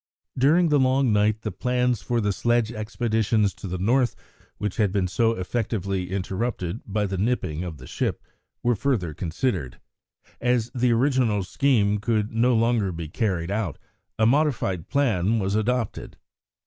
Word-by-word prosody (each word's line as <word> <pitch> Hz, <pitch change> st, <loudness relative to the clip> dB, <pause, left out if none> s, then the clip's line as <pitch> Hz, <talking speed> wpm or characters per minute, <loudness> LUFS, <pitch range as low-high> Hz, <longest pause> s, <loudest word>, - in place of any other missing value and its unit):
During 160 Hz, +6 st, +4 dB
the 150 Hz, -1 st, +4 dB
long 130 Hz, -2 st, +3 dB
night 105 Hz, +1 st, +2 dB
the 105 Hz, -, -2 dB
plans 125 Hz, +3 st, 0 dB
for 120 Hz, +4 st, -1 dB
the 105 Hz, -2 st, 0 dB
sledge 120 Hz, +2 st, +1 dB
expeditions 110 Hz, -2 st, 0 dB
to -, -, -8 dB
the 90 Hz, 0 st, -3 dB
North, 120 Hz, +7 st, +2 dB, 0.4 s
which 105 Hz, -2 st, -3 dB
had 105 Hz, -4 st, +2 dB
been 95 Hz, -2 st, 0 dB
so 115 Hz, +5 st, +2 dB
effectively 100 Hz, -2 st, -2 dB
interrupted 95 Hz, +1 st, -3 dB
by 105 Hz, +1 st, 0 dB
the 95 Hz, -2 st, -3 dB
nipping 95 Hz, -8 st, -1 dB
of 85 Hz, -4 st, -6 dB
the -, -, -12 dB
ship, -, -, -2 dB, 0.4 s
were 120 Hz, 0 st, +3 dB
further 105 Hz, -, -1 dB
considered. 85 Hz, -, -2 dB, 0.6 s
As 120 Hz, -1 st, +1 dB
the 125 Hz, -1 st, +2 dB
original 120 Hz, -4 st, +2 dB
scheme 105 Hz, -1 st, +2 dB
could 105 Hz, -1 st, 0 dB
no 120 Hz, +2 st, +3 dB
longer 115 Hz, -4 st, +2 dB
be 80 Hz, -2 st, -6 dB
carried 90 Hz, -2 st, -1 dB
out, 100 Hz, -8 st, -2 dB, 0.4 s
a 110 Hz, -, +3 dB
modified 115 Hz, -, +1 dB
plan 115 Hz, -7 st, +2 dB
was 100 Hz, -2 st, -1 dB
adopted. 115 Hz, +1 st, -1 dB
110 Hz, 155 wpm, -25 LUFS, 95-120 Hz, 0.6 s, During